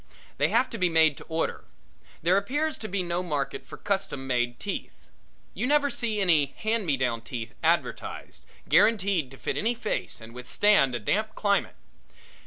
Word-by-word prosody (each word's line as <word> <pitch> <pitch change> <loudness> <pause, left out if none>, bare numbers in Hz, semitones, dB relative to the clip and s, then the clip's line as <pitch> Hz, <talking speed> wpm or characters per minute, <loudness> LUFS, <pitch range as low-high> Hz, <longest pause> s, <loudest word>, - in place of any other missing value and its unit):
They - - +4
have 255 - +3
to 230 - -5
be 180 -1 +3
made 160 -3 +4
to - - -10
order; 160 0 -2 0.6
there 175 +3 +4
appears 290 +11 0
to 215 - -5
be 190 -1 -1
no 175 0 -1
market 150 -6 -3
for - - -9
custom 195 -9 -2
made 120 -2 0
teeth; 200 - -6 0.5
you 250 - -2
never 285 0 +3
see 220 -3 -1
any 160 -7 +3
hand 220 -2 0
me 140 -3 +2
down 120 -3 0
teeth 115 -1 -6
advertised, - - -1 0.2
guaranteed 200 - +3
to 135 - -13
fit - - -3
any 235 +3 +1
face 225 -2 -3
and 110 0 -12
withstand 135 +2 +3
a - - -2
damp 215 - -1
climate. 200 -1 +1
180 Hz, 175 wpm, -27 LUFS, 135-215 Hz, 0.6 s, They